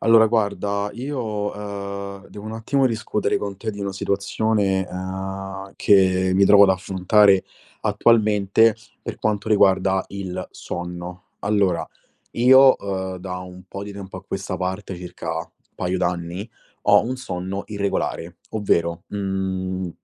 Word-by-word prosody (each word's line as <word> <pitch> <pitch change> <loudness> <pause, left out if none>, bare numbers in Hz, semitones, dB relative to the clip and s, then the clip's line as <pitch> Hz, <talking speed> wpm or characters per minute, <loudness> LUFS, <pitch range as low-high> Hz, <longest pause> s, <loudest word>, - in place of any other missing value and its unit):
Allora, 115 0 +6
guarda, 100 -2 0
io, 135 +5 -4 0.4
uhm, 100 -1 -6
devo 105 - -10
un 110 - -5
attimo 130 +5 +1
discutere 110 -3 -1
con 100 -1 -5
te 110 +3 -4
di 100 -1 -8
una 100 -1 -2
situazione, 100 0 0
uhm, 95 +1 -5
che 95 -2 +4
mi 100 +1 +5
trovo 100 +1 +8
ad - - +3
affrontare 95 +1 +4 0.4
attualmente, 110 0 +3 0.3
per - - -5
quanto 105 0 -1
riguarda 95 -2 +3
il 95 -2 -5
sonno. 90 +1 -7 0.2
Allora, 95 -6 +1 0.5
io, 130 +2 +7
uhm, 95 -2 -3
da 90 0 -5
un 90 0 -10
po' 100 +1 -7
di 100 0 -7
tempo 95 -1 -8
a 95 - -13
questa 95 -1 -4
parte, 95 +1 -3
circa 85 -2 -5 0.2
paio 90 +1 -1
d'anni, 85 +4 -2 0.3
ho 105 0 +6
un 125 +3 -3
sonno 95 -4 -4
irregolare. 100 -4 -2
Ovvero, 85 -6 0
mhmm, 95 -2 -2
100 Hz, 135 wpm, -22 LUFS, 95-105 Hz, 0.5 s, trovo